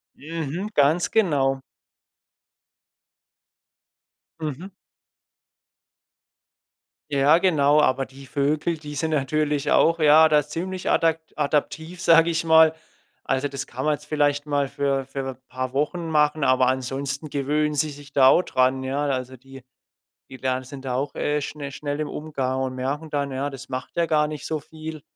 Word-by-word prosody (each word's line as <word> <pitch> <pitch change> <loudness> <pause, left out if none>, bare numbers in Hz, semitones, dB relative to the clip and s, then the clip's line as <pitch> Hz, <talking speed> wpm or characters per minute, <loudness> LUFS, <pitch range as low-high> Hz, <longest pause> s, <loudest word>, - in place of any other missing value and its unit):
Mhm. 165 +5 -5
Ganz 150 +5 +3
genau. 140 -11 +2 2.8
Mhm. 160 +5 -6 2.4
Ja, 140 +3 +5
genau. 150 -5 +3
Aber 135 -1 +1
die 135 +1 -14
Vögel, 145 +5 -1
die 150 -1 -9
sind 160 +3 -1
natürlich 150 0 0
auch, 165 0 +4
ja, 155 +1 +6
da 150 -1 +4
ziemlich 180 +5 -4
adak 165 -1 +2 0.2
adaptiv, 160 +4 -2
sag 165 -2 +5
ich 165 -1 0
mal. 160 -1 +6 0.5
Also, 135 +2 0
das 140 -1 -6
kann 130 +3 -5
man 155 - +3
jetzt 150 0 -7
vielleicht 145 -1 0
mal 145 -2 0
für 135 0 -1
für 135 +1 -7
'n 130 - -14
paar 130 0 -4
Wochen 160 +5 -1
machen, 150 -1 +2
aber 130 -1 +3
ansonsten 135 +3 -2
gewöhnen 150 +2 0
sie 155 +1 +1
sich 145 0 -12
da 135 -2 +6
auch 155 - +6
dran, 130 -2 +1
ja? 135 +2 -2
Also 130 -1 -3
die 135 +1 -14 0.7
die 130 - -10
lernen 130 0 -1
sind 135 +1 -10
da 130 -2 -2
auch, 135 +3 -2
äh, 150 0 -1
schne 145 0 -6
schnell 145 +1 -4
im 155 - -2
Umgang 135 -4 -3
und 130 -1 -3
merken 140 +5 -4
dann, 140 -1 -1
ja, 135 +2 -2
das 135 +1 -10
macht 130 -1 -6
ja 170 -1 +2
gar 150 -2 +2
nicht 150 -1 -7
so 155 - -2
viel, 155 +1 -9
145 Hz, 155 wpm, -24 LUFS, 135-155 Hz, 2.8 s, ja